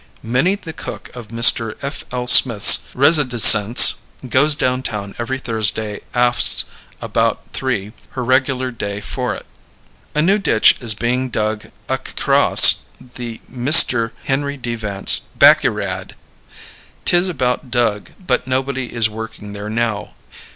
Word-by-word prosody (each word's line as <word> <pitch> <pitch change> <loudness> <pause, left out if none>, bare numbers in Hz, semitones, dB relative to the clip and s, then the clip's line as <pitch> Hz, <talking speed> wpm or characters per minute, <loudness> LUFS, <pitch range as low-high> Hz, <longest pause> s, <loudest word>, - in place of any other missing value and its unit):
Minnie 125 - -1
the 165 -5 -11
cook - - -10
of 120 -3 -11
Mr. 115 0 +3
F. 140 +1 -7
L. 125 0 -5
Smith's 120 -4 +5
residisence 125 -6 +6 0.3
goes 140 +5 +2
downtown 115 -7 -4
every 130 +3 -5
Thrusday 110 -3 -2
afts 120 0 +2 0.4
about - - -3
three 110 -6 -5 0.2
her 125 - -3
regular 130 0 -1
day 105 -3 -7
for 105 - -6
it. - - -12 0.7
A 150 - 0
new 195 +5 +1
ditch 110 - +2
is 115 -3 0
being 125 +4 -3
dug 110 -2 -4 0.2
accross - - +3 0.2
the 120 -2 -11
MR. 125 -2 +4
Henry 140 +1 -4
D. 120 -2 -6
Vance 100 -4 0 0.2
backyrad. - - +1 0.9
;Tis 175 +1 +1
about 130 -5 -4
dug 115 -4 -2 0.2
but 130 - -2
nobody 130 0 -4
is 115 -2 0
working 110 -1 -10
there 105 +1 -8
now. 110 -2 -4
120 Hz, 125 wpm, -16 LUFS, 110-130 Hz, 0.9 s, residisence